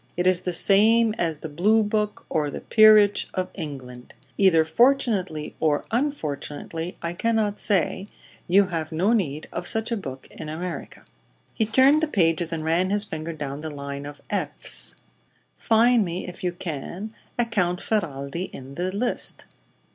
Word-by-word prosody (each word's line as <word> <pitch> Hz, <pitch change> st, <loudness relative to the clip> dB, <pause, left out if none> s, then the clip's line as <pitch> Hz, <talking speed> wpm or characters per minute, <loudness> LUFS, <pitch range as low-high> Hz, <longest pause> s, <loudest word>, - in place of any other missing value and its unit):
It 175 Hz, -, 0 dB
is 185 Hz, -1 st, +3 dB
the 180 Hz, -, -2 dB
same 215 Hz, +5 st, +4 dB
as 165 Hz, -3 st, 0 dB
the 160 Hz, -, -7 dB
'Blue 205 Hz, +9 st, +2 dB
Book' 210 Hz, 0 st, -2 dB
or 150 Hz, -2 st, 0 dB
the -, -, -6 dB
'Peerage' 215 Hz, -2 st, +5 dB
of 185 Hz, -1 st, -2 dB
England. 130 Hz, -7 st, -8 dB, 0.2 s
Either 170 Hz, -5 st, +4 dB
fortunately 195 Hz, -, +1 dB
or 150 Hz, -2 st, +1 dB
unfortunately 165 Hz, -, -3 dB
I 170 Hz, 0 st, -2 dB
cannot 215 Hz, +1 st, 0 dB
say 195 Hz, 0 st, +1 dB, 0.4 s
you 195 Hz, +3 st, +5 dB
have 160 Hz, -3 st, -3 dB
no 185 Hz, +8 st, +2 dB
need 155 Hz, -9 st, -1 dB
of 175 Hz, -, -3 dB
such 225 Hz, +2 st, 0 dB
a -, -, +1 dB
book 135 Hz, -10 st, -7 dB
in 155 Hz, -, -8 dB
America." 170 Hz, +3 st, -6 dB, 0.5 s
He 220 Hz, -, 0 dB
turned 265 Hz, +7 st, +5 dB
the 320 Hz, -, +1 dB
pages 170 Hz, -, +1 dB
and 160 Hz, -1 st, -3 dB
ran 170 Hz, +3 st, +1 dB
his 205 Hz, +1 st, +3 dB
finger 160 Hz, -3 st, -5 dB
down 145 Hz, -3 st, -5 dB
the 155 Hz, +1 st, -5 dB
line 140 Hz, -1 st, -6 dB
of 145 Hz, 0 st, -10 dB
"Fs." -, -, -1 dB, 0.6 s
"Find 230 Hz, 0 st, +3 dB
me, 175 Hz, 0 st, -4 dB
if 180 Hz, 0 st, -9 dB
you 180 Hz, -, 0 dB
can, 175 Hz, +6 st, -6 dB, 0.2 s
a 240 Hz, -, +2 dB
Count 180 Hz, -6 st, 0 dB
Ferralti 170 Hz, -5 st, -2 dB
in 135 Hz, +1 st, -10 dB
the 180 Hz, +5 st, -2 dB
list." 230 Hz, +6 st, -1 dB
180 Hz, 160 wpm, -24 LUFS, 155-215 Hz, 0.6 s, Peerage